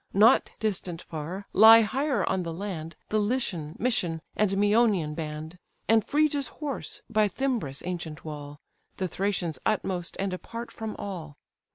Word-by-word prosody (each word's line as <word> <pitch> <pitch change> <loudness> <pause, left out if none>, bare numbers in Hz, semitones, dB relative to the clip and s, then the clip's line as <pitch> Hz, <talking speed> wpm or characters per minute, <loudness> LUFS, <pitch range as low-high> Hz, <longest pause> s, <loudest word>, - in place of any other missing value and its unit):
Not 220 +5 +5
distant 185 -5 -2
far, 170 +5 -6
lie 225 +2 +9
higher 260 0 0
on 190 - +1
the 170 -1 -4
land 165 -3 -5
The 215 - +2
Lycian, 205 -9 -1
Mysian, 180 -9 0 0.2
and 210 -2 +3
Mæonian 205 -5 +3
band, 155 +2 -6 0.3
And 225 0 +5
Phrygia's 295 -2 +2
horse, 295 -3 -6
by 215 -2 +3
Thymbras' 225 - -2
ancient 170 -4 -5
wall; 145 -1 -7 0.4
The 185 - -1
Thracians 180 -4 -2
utmost, 185 -5 -1
and 195 -1 -1
apart 230 +5 -6
from 220 -2 -5
all. 165 -7 -6
195 Hz, 145 wpm, -27 LUFS, 165-220 Hz, 0.4 s, lie